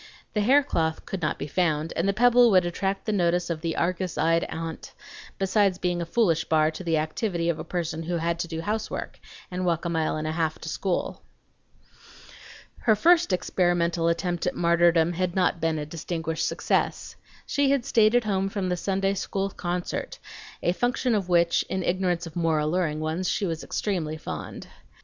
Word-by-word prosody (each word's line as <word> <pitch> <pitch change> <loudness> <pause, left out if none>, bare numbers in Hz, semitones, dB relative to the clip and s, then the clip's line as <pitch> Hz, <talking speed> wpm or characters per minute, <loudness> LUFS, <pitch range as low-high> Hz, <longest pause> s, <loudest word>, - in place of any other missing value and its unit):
The 210 - +1
haircloth 205 - +2
could 195 - -5
not 155 - -1
be - - -4
found, 160 0 0
and 170 - 0
the - - +5
pebble 245 +3 +5
would 185 -4 +4
attract 195 +3 -2
the 215 - 0
notice 175 -3 +1
of 160 -2 -3
the 165 -1 -2
Argus 180 0 -1
eyed 165 +1 +2
aunt, 165 0 -6 0.4
besides 195 -1 +2
being 175 -1 -1
a 170 - -4
foolish 170 -5 +2
bar 155 -1 +3
to 160 - -8
the 165 -2 +1
activity 170 +2 -1
of 165 -2 -1
a - - -4
person 165 -1 -3
who 170 +1 -2
had 170 +1 -1
to 170 - -2
do 165 -1 -4
housework 215 +4 -4 0.3
and 180 +1 -3
walk 170 -2 0
a - - 0
mile 160 -2 0
and 155 - -3
a 155 - -1
half 160 -1 -1
to 160 - -5
school. 185 +2 -2 1.6
Her 220 -2 +3
first 335 - +4
experimental 175 -2 +1
attempt 175 +1 -1
at 180 - -1
martyrdom 170 0 +3
had 180 0 -2
not 180 -3 +1
been 165 -1 +1
a 150 - -3
distinguished 160 0 -3
success. - - -1 0.3
She 285 -1 +1
had 275 -3 +1
stayed 220 0 +4
at 245 - +4
home 195 -2 0
from 195 -2 -2
the 180 - 0
Sunday 195 +1 0
school 195 0 -2
concert, 175 0 -4 0.5
a 175 - +3
function 245 +4 0
of 195 -4 -1
which, 170 -1 +3
in 190 -1 -2
ignorance 175 -1 0
of 165 - -10
more 165 -2 +1
alluring 155 0 0
ones, 160 +4 -1
she 200 - 0
was 165 -3 -3
extremely 165 -7 -2
fond. - - -7
175 Hz, 190 wpm, -26 LUFS, 165-195 Hz, 1.6 s, the